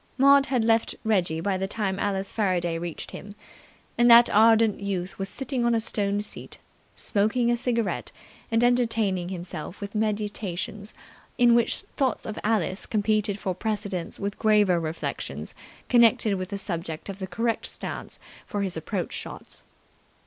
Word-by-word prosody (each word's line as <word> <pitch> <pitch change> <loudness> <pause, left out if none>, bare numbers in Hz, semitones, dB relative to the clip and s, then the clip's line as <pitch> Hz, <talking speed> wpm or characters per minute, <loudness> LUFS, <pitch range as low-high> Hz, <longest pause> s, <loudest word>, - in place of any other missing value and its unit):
Maud 275 +1 +6
had 250 -4 +1
left 225 0 +2
Reggie 180 -7 +1
by 190 +1 -1
the 190 - -1
time 200 -2 -2
Alice 195 -1 -2
Faraday 175 -5 0
reached 170 -1 -6
him, 205 0 -9 0.6
and 240 0 +6
that 235 0 +8
ardent 225 0 +5
youth 190 -2 -4
was 195 0 -2
sitting 265 -2 -3
on 235 0 +3
a - - +2
stone 205 -2 -1
seat, 210 - -6 0.4
smoking 225 +3 +1
a - - +3
cigarette 235 -3 -1 0.4
and 230 +1 +2
entertaining 225 -7 +1
himself 175 -1 -6
with 200 0 -6
meditations 210 -2 -3 0.4
in 240 -1 +5
which 235 -1 +2 0.2
thoughts 260 -4 0
of 215 - -5
Alice 205 -3 +1
competed 210 -1 0
for 190 -3 -2
precedence 205 -3 -3
with 200 0 -4
graver 210 -5 +4
reflections 160 0 -5 0.3
connected 235 -3 +4
with 185 -1 -3
the 200 - -3
subject 170 -5 -5
of 195 -1 -7
the 190 - -4
correct 230 +5 -1
stance - - -5 0.3
for 205 -3 -2
his 190 -2 -3
approach 170 +3 -3
shots. - - -7
205 Hz, 155 wpm, -26 LUFS, 190-230 Hz, 0.6 s, that